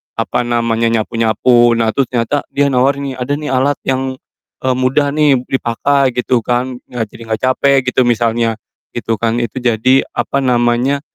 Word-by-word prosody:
apa 115 +2 -1
namanya, 115 -1 0
nyapu-nyapu. 115 +1 +2
Nah 110 -1 +1
terus 135 -2 +1
ternyata 125 +4 -1
dia 140 0 +1
nawar 130 +2 +2
nih, 135 -2 -5
"Ada 135 +3 -2
nih 150 -2 -4
alat 135 +2 +1
yang, 130 0 -1 0.5
eee, 130 - +2
mudah 140 +3 +1
nih 145 -4 +3
dipakai," 135 +1 0
gitu 125 0 +1
kan, 125 +1 -1
eee, 120 -2 -2
"Jadi 115 - -14
nggak 110 -1 -3
capek," 135 +1 +3
gitu 130 - +2
misalnya, 115 -1 +1 0.4
gitu 115 -1 -1
kan, 115 +1 0
itu 120 +3 -4
jadi, 125 +2 +2
apa 140 - -1
namanya, 125 +3 +1
125 Hz, 165 wpm, -15 LUFS, 115-135 Hz, 0.5 s, nih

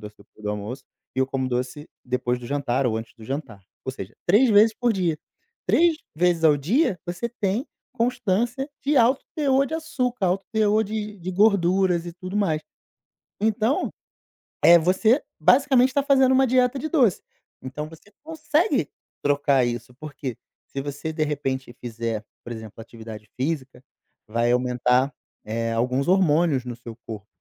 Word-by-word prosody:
doce 105 0 -10
depois 105 +1 -20
do 105 - -1
almoço 105 +6 -5 0.3
e 130 - -4
eu 130 - +3
como 130 -1 -2
doce 125 +4 -3 0.2
depois 125 -1 -1
do 120 - -8
jantar 135 -2 0
ou 110 -2 0
antes 110 0 -7
do 110 - -13
jantar". 130 -7 -5 0.2
Ou 130 - -3
seja, 100 -4 -8
3 220 +8 +5
vezes 215 +1 +6
por 240 -2 +1
dia. 175 -5 0 0.5
3 335 -2 +4 0.2
vezes 175 -1 +2
ao 150 -2 +6
dia 190 - +1
você 180 +7 -3
tem 220 +2 -2 0.3
constância 240 +3 0
de 285 +1 +1
alto 255 +3 +4
teor 275 -3 +3
de 320 - -4
açúcar, 250 -9 -1
alto 185 +2 0
teor 215 0 +3
de 210 0 -4
de 180 +2 -5
gorduras 185 -3 +3
e 170 - -6
tudo 185 +3 -6
mais. 160 -7 +1 0.8
Então, 220 +4 +1 0.7
eh, 170 0 +9
você 215 - +3 0.2
basicamente 260 -1 +4
tá 280 - +3
fazendo 265 -2 +4
uma 265 0 +4
dieta 255 +1 +2
de 315 - -3
doce. 250 - +3 0.4
Então 150 +4 -6
você 165 +6 -16
consegue 315 +3 0 0.3
trocar 140 -3 +2
isso, 120 +1 -4
porque 140 -4 -6 0.3
se 135 - -5
você 145 +3 -5
de 155 -1 0
repente 130 -4 -3
fizer, 115 -2 -4 0.2
por 120 - -6
exemplo, 110 -1 -10
atividade 110 -2 -10
física, 135 -2 -3 0.4
vai 115 +2 +1
aumentar, 125 +2 +2 0.3
eh, 115 +1 -2
alguns 125 +5 0
hormônios 165 -7 +3
no 120 - -5
seu 115 -1 -10
corpo, 105 -2 -7
160 Hz, 160 wpm, -24 LUFS, -, 0.8 s, eh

